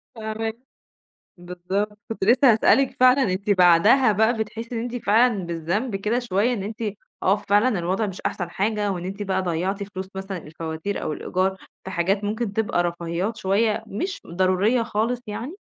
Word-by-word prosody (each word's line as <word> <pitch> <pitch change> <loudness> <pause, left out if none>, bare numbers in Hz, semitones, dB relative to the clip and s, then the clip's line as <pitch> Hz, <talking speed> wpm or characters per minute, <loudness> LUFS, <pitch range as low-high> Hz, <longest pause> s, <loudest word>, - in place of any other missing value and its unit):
فاهما 220 0 -3 0.8
بالضبط، 185 +4 -4
كنت 225 - -4
لسه 245 +5 +6
هاسألِك 265 +4 +3
فعلًا، 255 +2 +6
أنتِ 195 +2 -4
بعدها 200 +7 +5
بقى 220 +3 +3
بتحسّي 225 +2 -5
إن - - -1
أنتِ 240 +1 -4
فعلًا 220 -1 +3
بالذنب 175 +8 -2
كده 210 +5 0
شويّة 235 0 +1
إن 205 -5 -3
أنتِ 220 +3 -6 0.4
آه، 190 - +4
فعلًا 210 +1 +2
الوضع 185 +5 0
مش 190 -2 -7
أحسن 175 -1 -3
حاجة، 205 +2 -1
وإن 180 -2 -4
أنتِ 195 +2 -4
بقى 190 -1 0
ضيّعتِ 185 +3 -2
فلوس 190 -1 -7
مثلًا 195 0 -5
الفواتير 160 +4 -5
أو 155 - -2
الإيجار 185 +5 -1 0.3
في 190 - -7
حاجات 190 +4 0
ممكن 215 0 -2
تبقى 205 -5 0
رفاهيات 175 +5 -2
شويّة، 210 +3 +1
مش 365 - -4
ضرورية 185 +7 +2
خالص 230 +2 -1
يعني؟ 235 - -5
205 Hz, 165 wpm, -23 LUFS, 185-225 Hz, 0.8 s, لسه